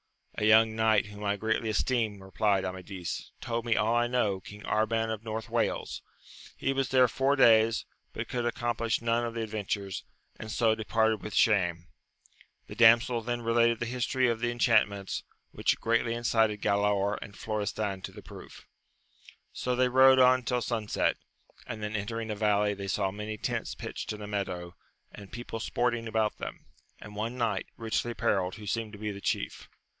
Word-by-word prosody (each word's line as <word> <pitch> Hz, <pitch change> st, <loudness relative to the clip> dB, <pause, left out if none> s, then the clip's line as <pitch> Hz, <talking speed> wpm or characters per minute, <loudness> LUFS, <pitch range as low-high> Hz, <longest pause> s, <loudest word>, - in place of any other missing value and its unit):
A 105 Hz, -, -1 dB
young 110 Hz, +1 st, +5 dB
knight 110 Hz, -1 st, +3 dB
whom 105 Hz, 0 st, -10 dB
I 100 Hz, 0 st, +1 dB
greatly 110 Hz, +2 st, -1 dB
esteem, 110 Hz, -2 st, 0 dB
replied 95 Hz, 0 st, +1 dB
Amadis, 95 Hz, -1 st, -5 dB
told 115 Hz, -2 st, -3 dB
me 115 Hz, -1 st, +1 dB
all 105 Hz, +3 st, +2 dB
I 120 Hz, 0 st, +2 dB
know; 110 Hz, -6 st, 0 dB
King 105 Hz, +2 st, -12 dB
Arban 110 Hz, +1 st, 0 dB
of 110 Hz, 0 st, -7 dB
North 110 Hz, -1 st, -4 dB
Wales: -, -, -1 dB, 0.6 s
he 135 Hz, -, 0 dB
was 135 Hz, -2 st, -1 dB
there 130 Hz, -1 st, +5 dB
four 135 Hz, +4 st, +1 dB
days, 115 Hz, -3 st, +5 dB, 0.3 s
but -, -, -5 dB
could 120 Hz, -1 st, -2 dB
accomplish 120 Hz, -1 st, -1 dB
none 115 Hz, +1 st, +1 dB
of 115 Hz, -1 st, -4 dB
the 115 Hz, -, -2 dB
adventures, 100 Hz, -3 st, -3 dB, 0.4 s
and 110 Hz, -, -6 dB
so 115 Hz, 0 st, +3 dB
departed 110 Hz, 0 st, +1 dB
with 105 Hz, -, -6 dB
shame. 85 Hz, -7 st, +3 dB, 0.8 s
The -, -, -10 dB
damsel 115 Hz, +1 st, +5 dB
then 120 Hz, +1 st, -3 dB
related 115 Hz, 0 st, +3 dB
the -, -, -2 dB
history 125 Hz, +1 st, 0 dB
of 115 Hz, -1 st, -1 dB
the 120 Hz, +1 st, 0 dB
enchantments, 110 Hz, -5 st, +1 dB, 0.3 s
which -, -, 0 dB
greatly 115 Hz, 0 st, +1 dB
incited 110 Hz, -3 st, +1 dB
Galaor 100 Hz, 0 st, +1 dB
and 100 Hz, -, -10 dB
Florestan 105 Hz, -2 st, -3 dB
to -, -, -7 dB
the -, -, -12 dB
proof. -, -, -12 dB, 0.9 s
So 125 Hz, 0 st, -1 dB
they 125 Hz, 0 st, +3 dB
rode 130 Hz, +1 st, +7 dB
on 130 Hz, 0 st, +6 dB
till 125 Hz, 0 st, -1 dB
sunset, 110 Hz, -3 st, 0 dB, 0.5 s
and 110 Hz, -2 st, -6 dB
then 105 Hz, +1 st, -3 dB
entering 110 Hz, +2 st, -3 dB
a -, -, -2 dB
valley, 105 Hz, -1 st, +2 dB
they 100 Hz, -1 st, -6 dB
saw 95 Hz, 0 st, 0 dB
many 105 Hz, +2 st, -5 dB
tents -, -, -3 dB
pitched -, -, -6 dB
in 105 Hz, -1 st, -6 dB
a -, -, -6 dB
meadow, 90 Hz, -4 st, -4 dB, 0.4 s
and 100 Hz, -2 st, -12 dB
people 120 Hz, -1 st, -6 dB
sporting 120 Hz, 0 st, -1 dB
about 110 Hz, -1 st, 0 dB
them, -, -, -7 dB, 0.3 s
and 105 Hz, 0 st, -11 dB
one 115 Hz, +4 st, -3 dB
knight, 110 Hz, -5 st, -1 dB
richly 115 Hz, +1 st, -1 dB
apparelled, 95 Hz, -5 st, 0 dB
who 105 Hz, -1 st, -10 dB
seemed 110 Hz, +1 st, -2 dB
to -, -, -8 dB
be 105 Hz, 0 st, -3 dB
the 100 Hz, 0 st, -8 dB
chief. -, -, -3 dB
110 Hz, 180 wpm, -29 LUFS, 105-115 Hz, 0.9 s, rode